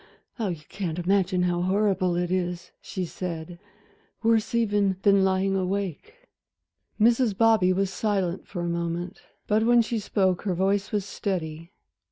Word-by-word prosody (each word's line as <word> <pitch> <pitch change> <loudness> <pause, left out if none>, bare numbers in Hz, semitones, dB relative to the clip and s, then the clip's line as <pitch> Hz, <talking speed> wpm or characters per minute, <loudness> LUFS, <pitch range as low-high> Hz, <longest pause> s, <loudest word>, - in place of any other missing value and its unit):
"Ah, 220 - 0
you 170 -5 -4
can't 180 -5 -4
imagine 185 0 +1
how 175 -1 0
horrible 185 -1 +1
it 175 0 -1
is," 180 -1 -2
she 185 -2 -4
said, 170 -1 -6 0.6
"worse 225 0 +2
even 205 -4 +2
than 200 -2 +5
lying 190 0 +1
awake." 195 - -3 0.7
Mrs. 230 -2 +3
Bobby 220 -5 +4
was 190 +1 0
silent 195 -5 -1
for 175 - -5
a - - -2
moment, 170 +2 -3 0.2
but 215 +1 +2
when 240 0 +5
she 225 0 -2
spoke 190 -3 0
her 190 -4 -1
voice 195 +2 0
was 205 -2 -1
steady. 165 -4 -4
190 Hz, 150 wpm, -26 LUFS, 175-205 Hz, 0.7 s, than